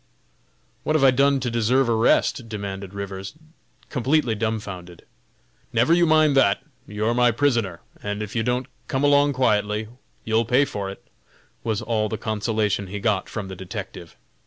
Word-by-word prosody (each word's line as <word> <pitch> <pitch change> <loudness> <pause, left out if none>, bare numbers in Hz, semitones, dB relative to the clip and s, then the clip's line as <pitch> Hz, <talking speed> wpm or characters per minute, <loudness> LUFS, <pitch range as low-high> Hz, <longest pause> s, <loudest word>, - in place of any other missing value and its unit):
"What 155 - 0
have 150 - +3
I 135 - +7
done 140 +1 +3
to 125 -1 -2
deserve 120 +3 +2
arrest?" 115 +1 +2
demanded 100 -2 -6
Rivers, 100 +3 -6 0.6
completely 135 -1 +1
dumbfounded. 105 -6 -4 0.7
"Never 120 +8 +3
you 170 0 +4
mind 155 -2 +4
that! 100 -7 +3 0.2
you're 105 +3 -1
my 125 0 +4
prisoner, 115 - 0 0.2
and 105 +1 -3
if 105 - -8
you 115 - +1
don't 125 +2 0 0.2
come 135 +1 -1
along 145 0 +4
quietly, 105 -4 +1 0.4
you'll 110 +1 +2
pay 125 +5 +3
for 100 -6 -4
it!" 95 - -11 0.6
was 110 -2 -1
all 110 -2 0
the 110 - -3
consolation 105 -2 -1
he 100 +3 -5
got 100 -3 0
from 105 -3 -5
the 95 - -7
detective. 95 -2 -8
110 Hz, 160 wpm, -23 LUFS, 100-130 Hz, 0.7 s, I